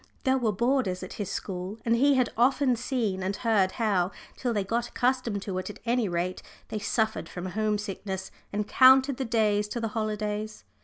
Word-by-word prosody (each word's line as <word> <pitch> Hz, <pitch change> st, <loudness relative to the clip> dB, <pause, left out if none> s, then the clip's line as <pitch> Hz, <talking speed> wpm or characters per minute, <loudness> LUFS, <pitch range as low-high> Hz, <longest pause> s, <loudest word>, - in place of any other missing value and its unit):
There 265 Hz, -1 st, +3 dB
were 230 Hz, -4 st, +1 dB
boarders 235 Hz, -4 st, 0 dB
at 185 Hz, -, -7 dB
his 200 Hz, -, -3 dB
school, 185 Hz, +2 st, -4 dB
and 230 Hz, 0 st, +3 dB
he 280 Hz, +4 st, +4 dB
had 255 Hz, -3 st, +2 dB
often 255 Hz, +2 st, +3 dB
seen 230 Hz, -6 st, -1 dB
and 190 Hz, +2 st, -1 dB
heard 205 Hz, -5 st, +2 dB
how, 195 Hz, -6 st, +1 dB, 0.3 s
till 245 Hz, -, -2 dB
they 205 Hz, -3 st, 0 dB
got 235 Hz, +4 st, -1 dB
accustomed 245 Hz, -6 st, 0 dB
to 190 Hz, -2 st, -3 dB
it 185 Hz, -, -5 dB
at 210 Hz, -, -8 dB
any 235 Hz, -3 st, +1 dB
rate, 175 Hz, +1 st, -2 dB, 0.3 s
they 215 Hz, -, -3 dB
suffered 220 Hz, +1 st, -1 dB
from 180 Hz, 0 st, -6 dB
home 210 Hz, +3 st, 0 dB
sickness, 195 Hz, -2 st, -5 dB, 0.2 s
and 210 Hz, 0 st, -2 dB
counted 265 Hz, +2 st, +6 dB
the 265 Hz, -, -2 dB
days 210 Hz, -3 st, +2 dB
to 235 Hz, -, -4 dB
the 225 Hz, -1 st, -2 dB
holidays. 215 Hz, 0 st, -3 dB
215 Hz, 195 wpm, -27 LUFS, 195-245 Hz, 0.3 s, counted